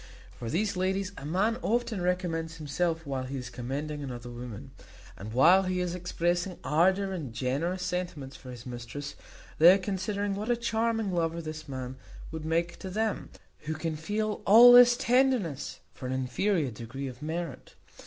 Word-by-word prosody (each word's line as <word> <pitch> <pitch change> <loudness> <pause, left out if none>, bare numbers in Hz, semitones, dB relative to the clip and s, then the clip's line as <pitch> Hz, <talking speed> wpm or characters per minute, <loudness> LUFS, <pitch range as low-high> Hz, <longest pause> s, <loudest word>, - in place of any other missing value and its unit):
To 115 - -4
these 200 - 0
ladies 190 +1 -1
a 140 - -7
man 205 +8 +1
often 230 -3 0
recommends 175 -3 -1
himself 165 +2 -2
while 135 -2 -3
he 135 +2 -5
is 125 -1 -6
commending 145 +5 -4
another 120 -3 -6
woman; 120 -3 -8 0.4
and, 105 +3 -8
while 165 +11 +6
he 185 -1 -1
is 180 -1 -1
expressing 175 0 -1
ardour 190 +5 +2
and 155 -9 -5
generous 155 +10 -1
sentiments 165 -8 -4
for 130 - -11
his 120 -2 -9
mistress, 125 +3 -6 0.5
they 170 +3 +10
are - - +2
considering 200 +1 -2
what 210 +4 -4
a 240 - +3
charming 225 -2 0
lover 165 -1 0
this 155 -2 -7
man 130 -1 -5 0.3
would 160 -1 -6
make 170 +2 -1
to 190 - -6
them, 220 +3 -2 0.4
who 155 +1 -2
can 160 0 -3
feel 210 +7 -2
all 235 +4 +10
this 245 0 +8
tenderness 245 - +1
for 130 - -7
an 130 - -2
inferior 135 - 0
degree 120 +5 -6
of 125 +1 -9
merit. 160 -3 -5
165 Hz, 170 wpm, -29 LUFS, 135-195 Hz, 0.5 s, they